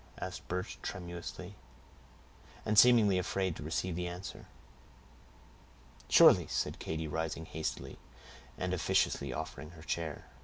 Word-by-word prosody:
asked - - -6
Birch, 90 +1 -4
tremulously, 90 +1 -6 1.1
and 105 0 +5
seemingly 110 -6 +6
afraid 95 -1 -1
to - - -8
receive 80 +3 -2
the 90 0 -2
answer. 90 +2 -7 1.6
"Surely," - - +7
said - - -2
Katy, 80 0 -3
rising 80 +1 -3
hastily, 80 0 -5 0.6
and - - -2
officiously 70 -2 +1
offering 75 +2 -6
her 80 - -12
chair. 80 -3 -3
85 Hz, 115 wpm, -33 LUFS, 80-95 Hz, 1.6 s, Surely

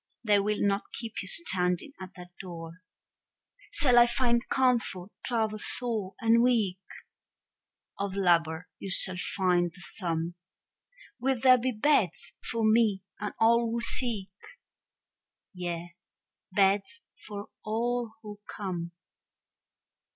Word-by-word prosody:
They 210 -3 +4
will 210 +1 0
not 200 0 0
keep 230 -1 -5
you 190 - -7
standing 185 - +1
at 190 0 -9
that 180 -1 -11
door. 170 -1 -9 0.9
Shall 250 - +6
I 240 - +7
find 240 -1 +2
comfort, 235 -8 +1
travel 220 -3 0
sore 220 -5 -2
and 230 0 +4
weak? 220 -7 +2 1.2
Of 200 -1 -2
labor 170 -2 +2
you 195 - -6
shall 185 0 +2 0.2
find 180 -2 +2
the 180 - -17
sum. 170 -2 -3 0.9
Will 260 0 0
there 255 0 +6
be 255 +2 0
beds 210 - +1
for 230 -1 -1
me 215 -3 +3 0.2
and 210 - -4
all 230 +1 +4
who 235 +1 -1
seek? 230 -4 -1 1.2
Yea, 175 -1 -5 0.6
beds 200 +4 +1 0.2
for 205 -1 -7
all 235 +1 -1
who 210 -1 -9
come. 175 -4 -5
205 Hz, 120 wpm, -29 LUFS, 180-235 Hz, 1.2 s, I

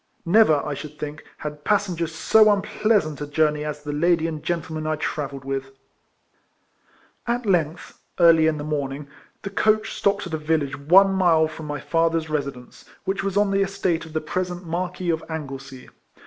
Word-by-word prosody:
Never, 170 -6 +4
I 150 - -2
should 150 +1 -8
think, 150 +1 -6
had 150 0 -7
passengers 180 -6 0
so 215 +6 +5
unpleasant 200 -6 +1
a 145 - -3
jour 150 +1 +2
ney 150 0 -5
as 150 -1 -5
the 145 0 -4
lady 165 +2 +2
and 155 -2 -3
gentleman 160 -2 -3
I 155 - +1
travelled 140 -3 -4
with. 135 0 -4 1.5
At 240 0 -1
length, 170 -4 -1 0.2
early 165 -2 +6
in 155 -1 +1
the 145 - -5
morning, 145 -1 -3 0.4
the 195 - -5
coach 215 +1 +1
stopped 200 0 0
at 175 - -7
a 160 - -1
village 150 -2 0
one 190 +7 +5
mile 170 -4 +4
from 155 0 -9
my 145 -1 -4
father's 165 +1 0
residence, 140 -4 -4 0.2
which 195 +1 -1
was 195 0 -1
on 205 -1 +3
the 195 0 +2
estate 195 -4 0
of 160 - -13
the 155 - -1
present 180 +2 -3
Marquis 180 +1 -2
of 160 0 -2
Anglesey. 135 -4 -7
160 Hz, 175 wpm, -23 LUFS, 150-185 Hz, 1.5 s, early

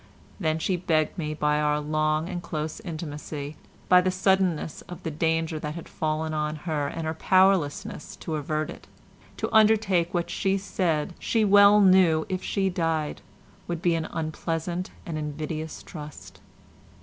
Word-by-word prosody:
Then 160 -4 +1
she 180 +3 0
begged 160 -3 +1
me 155 -1 -2
by 150 0 +1
our 150 0 +2
long 155 +1 0
and 180 -2 -4
close 155 0 -4
intimacy, 155 -5 -6 0.3
by 180 0 +7
the 185 - +1
suddenness 185 -4 +1
of 175 - -9
the 160 - -3
danger 160 +1 0
that 150 0 -5
had 170 - -8
fallen 155 0 -2
on 150 0 -1
her 150 -2 -2
and 165 +3 -4
her 160 - -1
powerlessness 185 -4 +2
to 160 - -6
avert 155 +1 -2
it, - - -12 0.5
to - - -3
undertake 210 -6 +4
what 175 -3 -1
she 195 0 +1
said 175 -5 -1
she 225 -2 +1
well 205 +1 +7
knew, 185 -5 +5
if 185 -1 -2
she 195 -2 0
died, 165 -4 -1 0.5
would 170 -1 -4
be 175 - +3
an 165 -1 -1
unpleasant 165 +3 -3 0.2
and 160 -3 -4
invidious 155 +1 -5
trust. 150 -3 -10
160 Hz, 160 wpm, -26 LUFS, 155-185 Hz, 0.5 s, by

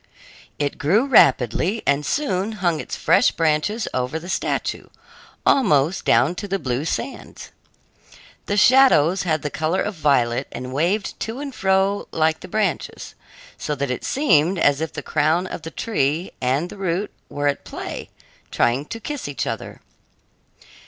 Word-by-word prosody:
It 145 -1 -2
grew 200 - +3
rapidly 180 - +3
and 140 +1 +2
soon 210 - -1
hung 175 -6 0
its - - -5
fresh - - +4
branches 165 +7 0
over 125 +4 -1
the 170 +3 -8
statue, - - -2 0.6
almost 165 - +3
down 125 +8 +4
to 205 - -5
the 195 0 -1
blue 130 -3 -2
sands. 265 - -5 1.0
The 205 - 0
shadows 205 - +5
had 155 -2 0
the 150 - -3
color 160 +4 0
of 210 - -3
violet 140 -7 +1
and 125 +1 -6
waved 180 +8 -1
to 225 +4 -4
and 285 -1 -6
fro 195 0 +1
like 160 0 +1
the - - -10
branches, 215 +2 -2 0.5
so 150 - -2
that 140 -2 -2
it 125 - -4
seemed 180 - +2
as 145 -3 +2
if 160 - -2
the - - -7
crown 155 +4 +1
of 185 - -6
the 160 - -7
tree 165 -4 -1
and 135 +7 0
the - - -10
root 190 +1 -2 0.2
were 145 0 -2
at 140 - -1
play, - - -7 0.4
trying 125 +5 +1
to 230 - -7
kiss 290 - -5
each 145 - -3
other. - - -6
165 Hz, 160 wpm, -22 LUFS, 145-200 Hz, 1.0 s, shadows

